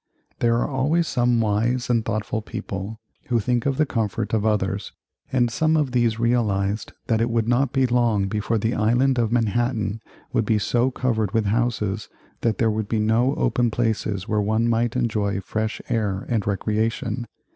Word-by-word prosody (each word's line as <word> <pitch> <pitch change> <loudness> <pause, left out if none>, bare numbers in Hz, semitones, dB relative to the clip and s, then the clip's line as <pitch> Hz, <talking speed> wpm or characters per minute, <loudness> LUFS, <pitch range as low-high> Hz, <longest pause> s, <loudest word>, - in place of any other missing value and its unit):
There 115 -1 +3
are 120 - 0
always 150 +5 +1
some 120 -2 +2
wise 115 +3 +1
and 115 -2 +2
thoughtful 110 +1 -2
people 100 +2 -6 0.3
who 120 -3 +2
think 120 +3 0
of 135 -1 0
the 155 - +3
comfort 110 -7 -2
of 110 0 +2
others, 100 -1 -1 0.4
and 120 -3 +2
some 160 +5 +2
of 145 -4 0
these 120 -3 +2
realized 110 -4 0
that 115 -1 +1
it 115 - +1
would 115 -1 0
not 125 +2 +2
be 135 -1 +2
long 120 -5 +2
before 105 +3 -1
the 110 +3 0
Island 120 +4 +2
of 115 -2 +1
Manhattan 115 -2 0 0.3
would 115 - +2
be 110 0 +2
so 120 +5 +1
covered 110 -6 -1
with 110 -1 +2
houses 110 -2 -1 0.3
that 115 -2 0
there 115 -1 +2
would 110 -1 -2
be 110 - -1
no 115 +5 +2
open 120 -1 +1
places 110 -3 -1
where 105 -1 +1
one 110 +3 +1
might 115 +1 +1
enjoy 105 -5 0
fresh 110 +3 -3
air 105 -5 -1
and 110 -5 -1
recreation. 110 +3 -1
115 Hz, 180 wpm, -23 LUFS, 105-120 Hz, 0.4 s, There